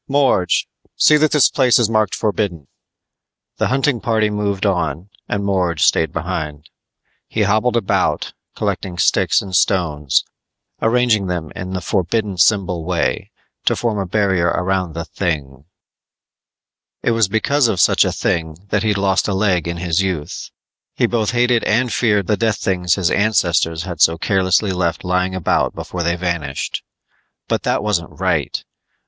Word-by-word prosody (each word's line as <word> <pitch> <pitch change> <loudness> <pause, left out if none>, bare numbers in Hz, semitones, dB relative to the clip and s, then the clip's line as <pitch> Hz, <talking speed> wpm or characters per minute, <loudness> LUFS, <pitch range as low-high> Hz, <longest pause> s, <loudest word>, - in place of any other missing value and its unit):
"Morge! 135 -10 +2 0.3
See 155 - +5
that 155 +1 +3
this 145 -2 +5
place 130 -3 +4
is 120 - +3
marked 110 -3 +1
forbidden." 100 -8 -2 0.9
The - - +1
hunting 135 -2 0
party 110 0 +1
moved 105 -1 -2
on 90 -1 -1 0.2
and 100 -1 -2
Morge 90 -5 0
stayed 80 -1 +3
behind. 75 0 -5 0.6
He 110 - 0
hobbled 110 +4 +2
about, 105 -5 0 0.2
collecting 90 -3 -3
sticks - - +2
and 95 -2 -5
stones, 75 -9 +1 0.6
arranging 115 -4 +2
them 85 -3 -4
in 90 +1 -6
the 95 - -3
"forbidden 100 +1 -1
symbol" 90 -5 +2
way 85 -7 -1 0.4
to - - +2
form 115 -4 -1
a 95 - -3
barrier 95 -3 +1
around 90 -1 -1
the 85 +1 -5
'thing. 75 -7 -4 1.4
It - - +2
was 115 -3 +2
because 120 +6 +1
of 100 - -1
such - - +4
a - - 0
'thing 80 -2 -2
that 105 0 +1
he'd 105 -1 +1
lost 95 -1 +1
a 100 - -1
leg 95 -5 +1
in 85 0 -3
his 85 +1 0
youth. 90 -6 -4 0.5
He - - +2
both 110 -3 0
hated 120 -1 +2
and 120 +3 +1
feared 105 -5 +1
the 105 - +1
death 110 -3 0
things 90 -2 0
his 95 -4 0
ancestors 85 -6 +1
had 90 -2 -6
so 80 0 +5
carelessly 95 +2 +1
left 90 -2 -1
lying 90 0 0
about 95 - 0
before 90 - -5
they 85 0 0
vanished. 85 -6 -3 0.7
But - - 0
that - - -1
wasn't 95 -6 -2
right. - - -1
95 Hz, 155 wpm, -18 LUFS, 85-110 Hz, 1.4 s, See